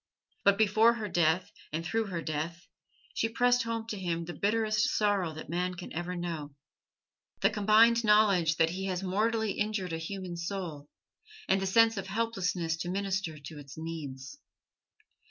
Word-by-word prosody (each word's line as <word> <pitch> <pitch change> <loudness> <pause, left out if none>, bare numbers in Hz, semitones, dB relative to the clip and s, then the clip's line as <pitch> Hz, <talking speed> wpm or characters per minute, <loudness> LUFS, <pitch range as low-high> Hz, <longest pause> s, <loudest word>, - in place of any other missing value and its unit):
But 200 0 +5
before 220 +2 +5
her 220 -2 -4
death 170 -1 +1 0.2
and 165 +2 -3
through 225 +5 0
her 170 -4 -4
death, 160 +3 -4 0.5
she 225 - 0
pressed 245 +2 +3
home 230 -1 -3
to 210 - -4
him 170 -2 -2
the 175 - -6
bitterest 215 +1 +1
sorrow 200 -5 +1
that 155 - -8
man 180 +2 -2
can 175 - -8
ever 175 +2 -3
know: 165 -5 -5 0.9
the - - +4
combined 220 +3 +5
knowledge 200 -6 +4
that 165 0 +2
he 190 +2 -4
has 185 0 -2
mortally 220 +3 +1
injured 210 -5 -2
a 165 - -2
human 180 +1 -5
soul 170 -5 -5 0.6
and 195 - +2
the 195 - -1
sense 225 +2 +4
of 195 - -4
helplessness 185 -7 -1
to 175 - -4
minister 190 -4 -2
to 145 +1 -10
its 140 -1 -11
needs. 160 - -7
185 Hz, 165 wpm, -30 LUFS, 165-215 Hz, 0.9 s, But